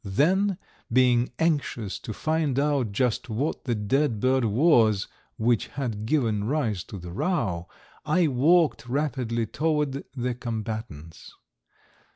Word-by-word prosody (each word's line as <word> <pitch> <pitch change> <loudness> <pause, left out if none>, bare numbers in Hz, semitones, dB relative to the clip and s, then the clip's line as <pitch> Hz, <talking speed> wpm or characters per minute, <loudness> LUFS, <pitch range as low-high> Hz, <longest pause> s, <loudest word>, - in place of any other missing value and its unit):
Then, 180 - +2 0.3
being 125 0 +3
anxious 145 - -1
to - - -7
find 155 +2 -1
out 140 -6 +1
just 125 +2 0
what 125 +8 -2
the 120 -3 0
dead 115 +3 0
bird 130 +2 +2
was 110 - +3 0.3
which 115 0 +1
had 115 -6 -4
given 110 -8 +1
rise 115 - -1
to 100 - -8
the 90 -1 -8
row, 95 - -1 0.4
I 170 +3 +2
walked 150 +1 +3
rapidly 125 -5 -1
toward 150 +1 -1
the 125 0 -1
combatants. 110 - -6
125 Hz, 125 wpm, -26 LUFS, 110-150 Hz, 0.4 s, being